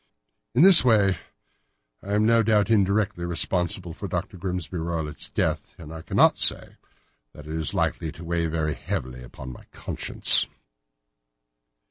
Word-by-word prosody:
In 135 - +4
this 190 -2 +9
way 105 -6 +2 0.8
I 100 - -6
am 105 +1 +1
no 115 +1 +3
doubt 110 -1 +1
indirectly 100 -3 0
responsible 90 +1 -2
for 100 - -8
Dr. 90 +3 -5
Grimesby 90 -2 -6
Roylott's 80 -2 -4
death, - - -3
and 80 -2 -11
I 80 - -9
cannot - - +2
say - - 0 0.6
that 75 - -14
it 80 - -8
is 80 -2 -4
likely 80 - -2
to 85 - -12
weigh 85 0 -2
very 80 -1 -3
heavily 65 -1 -6
upon 65 +1 -11
my - - -15
conscience." - - +3
85 Hz, 145 wpm, -23 LUFS, 80-105 Hz, 0.8 s, this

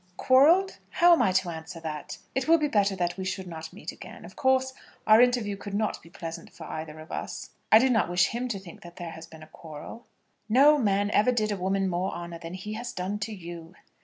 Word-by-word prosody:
"Quarrelled? 325 +9 +4
How 345 0 +5
am 335 - +4
I 190 - +3
to 185 -1 +1
answer 160 +1 -8
that? 155 -2 -6 0.2
It 265 +1 -1
will 330 +1 +6
be 305 -2 0
better 205 -6 +2
that 175 -1 -2
we 190 - -4
should 190 0 -3
not 160 -2 -8
meet - - -7
again. - - -11
Of 185 - -13
course, 260 -2 +2 0.3
our 215 +2 +7
interview 245 -5 +2
could 200 0 -7
not 215 +1 -1
be 165 - -16
pleasant 165 -1 -8
for 165 - -11
either 155 0 -7
of 155 - -12
us. - - -6 0.2
I 220 - +10
do 255 +4 +4
not 230 -8 +2
wish 175 0 +3
him 245 +2 -3
to 225 -5 -3
think 185 -3 -12
that 175 0 -12
there 175 -2 -7
has 160 0 -10
been 160 -1 -13
a - - -13
quarrel." 160 +9 -11 0.4
"No 285 +6 +6
man 205 -3 +1
ever 215 +4 +4
did 215 -3 0
a - - 0
woman 195 +1 0
more 185 +1 -1
honour 170 -1 -7
than 165 +1 -7
he 210 +3 -6
has 240 +3 -5
done 190 +3 -3
to 210 +2 -4
you." 170 -3 -9
195 Hz, 240 wpm, -27 LUFS, 170-235 Hz, 0.4 s, I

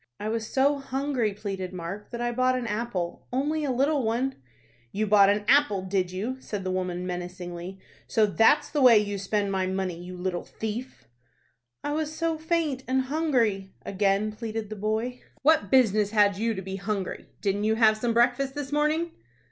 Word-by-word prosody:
"I 210 - -3
was 225 -1 -2
so 280 +2 +3
hungry," 270 -4 -1
pleaded 195 -2 -5
Mark, 185 +4 -6
"that 235 - -6
I 240 0 0
bought 255 +1 +2
an 250 - -3
apple, 210 -6 -3
only 295 +5 0
a 285 - -1
little 275 +3 +2
one." 245 +4 0 0.6
"You 215 +2 -1
bought 200 -1 +6
an 205 +1 +1
apple, 255 -8 +4
did 185 -1 -1
you?" 215 +8 -3
said 205 -6 -5
the 185 - -2
woman, 180 -1 -2
menacingly. 180 0 -6 0.3
"So 220 - +3
that's 225 +8 +3
the 295 - 0
way 245 -4 +8
you 205 -1 0
spend 200 +1 -1
my 190 -1 0
money, 190 -1 -2
you 180 0 -8
little 180 -1 -2
thief?" 225 +4 -6 0.8
"I 290 - -2
was 305 0 -1
so 325 0 -1
faint 320 -4 0
and 260 +1 +2
hungry," 230 -12 +1
again 200 +2 +1
pleaded 220 -1 -5
the - - -3
boy. 220 +4 -2 0.2
"What 300 -9 +4
business 215 -5 +4
had 205 -2 +4
you 225 +2 -1
to 190 - -5
be 190 +1 -5
hungry? 195 -1 -4
Didn't 205 +1 0
you 220 +1 +2
have 220 -1 +5
some 230 +1 -1
breakfast 245 +3 +2
this 290 -1 -5
morning?" 305 +3 +1
215 Hz, 185 wpm, -27 LUFS, 195-260 Hz, 0.8 s, way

